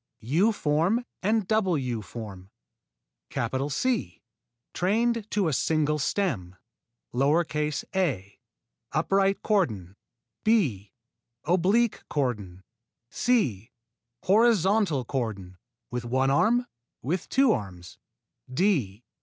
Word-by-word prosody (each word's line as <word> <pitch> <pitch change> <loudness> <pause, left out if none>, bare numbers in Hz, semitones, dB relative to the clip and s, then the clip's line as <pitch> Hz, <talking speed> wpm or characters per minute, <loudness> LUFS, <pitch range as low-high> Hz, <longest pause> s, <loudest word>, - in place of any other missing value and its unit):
_ - - -58 0.2
U 180 - +3
form 185 +6 +1 0.2
and 215 0 +1
double 200 -6 +2
U 125 -5 -3
form 100 -2 -9 1.2
C. 145 - -1 0.5
Trained 225 +4 0
to 205 -4 +1
a 155 - 0
single 150 +2 +1
stem: 130 - -1 0.7
a. 150 - 0 0.5
Upright 195 0 +1
cordon 110 - 0 0.5
b. 135 - +1 0.5
Oblique 195 +7 +2
cordon 105 -10 -2 0.5
c. 130 - 0 0.5
Horizontal 200 - +3
cordon 100 -9 -4 0.3
(with 125 0 -3
one 130 +3 +1
arm) 240 - +3 0.4
(with 170 +7 -2
two 270 -3 +4
arms) 90 - -5 0.5
_d. 130 - 0
150 Hz, 90 wpm, -27 LUFS, -, 1.2 s, two